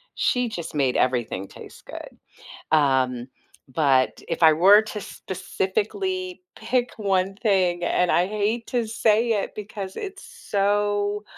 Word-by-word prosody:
she 250 -2 +1
just 170 -6 -6
made 135 -3 +1
everything 120 -6 0
taste - - -13
good. - - -10 0.5
Um, 130 -5 +2 0.4
but 130 -2 +1
if 165 - -3
I 160 -1 +8
were 195 +6 +7
to 215 -1 -6
specifically 360 - -3
pick 250 -1 -1
1 195 -2 0
thing, 185 -6 +1
and 180 0 +1
I 175 - +3
hate 215 +3 -2
to 240 -3 -1
say 225 +1 +2
it 205 -2 -2
because 200 -2 -7
it's 390 -1 -7
so, 205 0 -1
200 Hz, 130 wpm, -24 LUFS, 165-220 Hz, 0.5 s, I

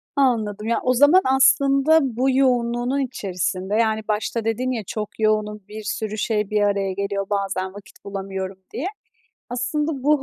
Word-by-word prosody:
Anladım. 220 -6 +1
Ya, 235 - +1
o 255 - +3
zaman 290 +9 +6
aslında 275 +3 +4
bu 260 -1 0
yoğunluğunun 245 0 +1
içerisinde, 190 -5 -2
yani, 220 -1 +2
başta 220 +1 -1
dedin 240 +3 0
ya, 230 -4 -3
"Çok 215 -1 -5
yoğunum, 215 -1 +1
bir 215 +1 -8
sürü 215 0 -3
şey 210 -1 0
bir 210 -1 +1
araya 200 -2 +1
geliyor, 200 0 -2
bazen 195 -2 -2
vakit 205 -1 -14
bulamıyorum" 195 -1 -5 0.2
diye. 300 +9 -3 0.6
Aslında 285 +3 -2
bu 290 0 +3
220 Hz, 155 wpm, -22 LUFS, 205-260 Hz, 0.6 s, zaman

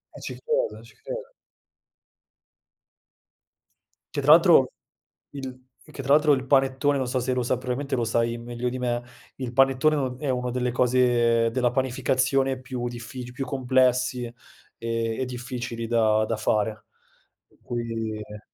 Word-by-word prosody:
Eh - - -10
ci - - -6
credo, 485 +1 -1
ci - - -17
credo. - - -7 2.8
Che - - 0
tra - - +5
l'altro - - +7 0.6
il 130 -2 -8 0.3
che 140 - -7
tra 135 - -1
l'altro 150 -1 +5
il 130 -1 -1
panettone, 135 +1 +2
non 130 -2 -1
so 130 +1 0
se 130 +2 -1
lo 125 -1 0
sa 120 - 0
probabilmente 130 +2 -3
lo 120 - 0
sai 115 +1 0
meglio 120 +1 -4
di 130 - -4
me, 120 -1 -1 0.4
il 125 -2 -5
panettone 135 +4 +4
è - - 0
un 125 -1 -3
è 145 - -2
una 125 -1 -1
delle 125 0 -1
cose 120 -2 +3
della 125 0 +1
panificazione 130 +1 +1
più 125 -2 -4
diffici 120 +1 -8
più 135 +1 -4
complessi 130 -2 +1
e 115 - -9 0.5
e 115 -1 -2
e - - 0
difficili 120 -2 -5
da 110 -2 +3
da 115 - -1
fare. 110 0 -1 0.6
Per - - -29
cui, 115 -2 -3
eh 105 0 -9
125 Hz, 160 wpm, -25 LUFS, 120-130 Hz, 2.8 s, l'altro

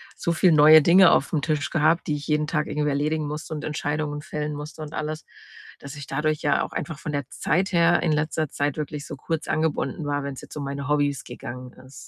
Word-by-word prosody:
so 170 - -1
viel 170 +2 +4
neue 155 +1 +8
Dinge 180 +4 +7
aufm 145 +2 +1
Tisch 145 -3 -1
gehabt, 160 +2 +2
die 150 - 0
ich 145 0 -7
jeden 150 0 +1
Tag 150 -1 -1
irgendwie 150 0 -1
erledigen 150 +2 -1
musste. 150 +2 -5
Und 150 -1 -5
Entscheidungen 150 -1 -3
fällen 150 0 -4
musste 150 +2 -8
und 155 0 -7
alles. 155 0 -4 0.6
Dass 140 +1 -9
ich 145 -2 -9
dadurch 150 +2 -1
ja 145 - +2
auch - - -6
einfach 160 -4 -4
von 150 - -5
der 145 -2 -2
Zeit 190 +4 0
her 170 0 +4
in 170 - +1
letzter 155 +1 0
Zeit 145 +1 -2
wirklich 150 -1 -5
so - - -7
kurz 160 +3 -4
angebunden 155 -2 -1
war, 145 -1 -1
wenn's 140 -1 -6
jetzt - - -12
um 150 - -4
meine 140 0 -4
Hobbys 145 -2 +1
gegangen 125 +1 -8
ist. 130 +1 -16
150 Hz, 225 wpm, -24 LUFS, 145-155 Hz, 0.6 s, neue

